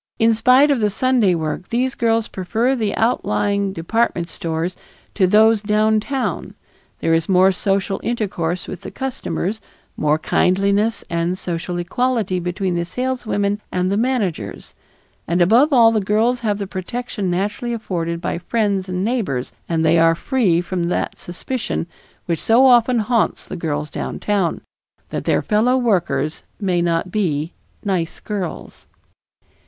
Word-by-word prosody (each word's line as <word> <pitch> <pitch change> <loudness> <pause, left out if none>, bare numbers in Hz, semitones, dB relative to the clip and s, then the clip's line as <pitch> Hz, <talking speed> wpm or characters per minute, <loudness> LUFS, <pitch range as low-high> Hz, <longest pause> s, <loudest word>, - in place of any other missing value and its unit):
In 225 -1 +4
spite 255 +6 +5
of 275 - +2
the 210 -1 +2
Sunday 230 -4 +2
work, 160 +2 -3
these 255 +2 0
girls 225 -2 +1
prefer 225 +8 0
the 215 -5 -1
outlying 200 - 0
department 180 -1 -1
stores 165 +2 -3 0.4
to 190 -3 +3
those 220 +2 +5
downtown; 215 +5 0 0.5
there 165 - +2
is 165 +2 +1
more 190 +1 +5
social 195 +1 -1
intercourse 185 -7 -2
with 185 - -7
the - - -7
customers, 230 -6 -3 0.3
more 150 0 +2
kindliness 200 +6 +1
and 170 +1 -1
social 175 0 -4
equality 220 0 0
between 180 +1 -2
the 170 0 0
saleswomen 215 -1 -2
and 180 +1 0
the - - +1
managers, 205 - -2 0.5
and 170 +2 +1
above 230 - +5
all 235 -4 +6
the 220 -2 +1
girls 220 +5 +1
have 210 -3 -1
the 200 - -3
protection 200 +1 -4
naturally 205 +7 -2
afforded 170 -7 -3
by 170 - -3
friends 200 0 -1
and 185 +1 -1
neighbors 190 - -2 0.2
and 160 -1 +1
they 165 +1 +4
are 165 0 +5
free 185 -5 +1
from 180 0 -2
that 175 - -1
suspicion 205 +2 -4 0.4
which 170 -3 -2
so 235 +4 +5
often 245 -1 +5
haunts 230 +1 0
the 190 - -7
girls 150 -3 -3
downtown, 200 -5 -1 0.5
that - - -4
their - - +2
fellow 235 +4 +2
workers 170 - 0 0.2
may 185 -4 +1
not 170 +1 0
be 165 -6 -1 0.3
"nice 180 -4 -1
girls." 200 -5 -6
200 Hz, 145 wpm, -20 LUFS, 175-230 Hz, 0.5 s, all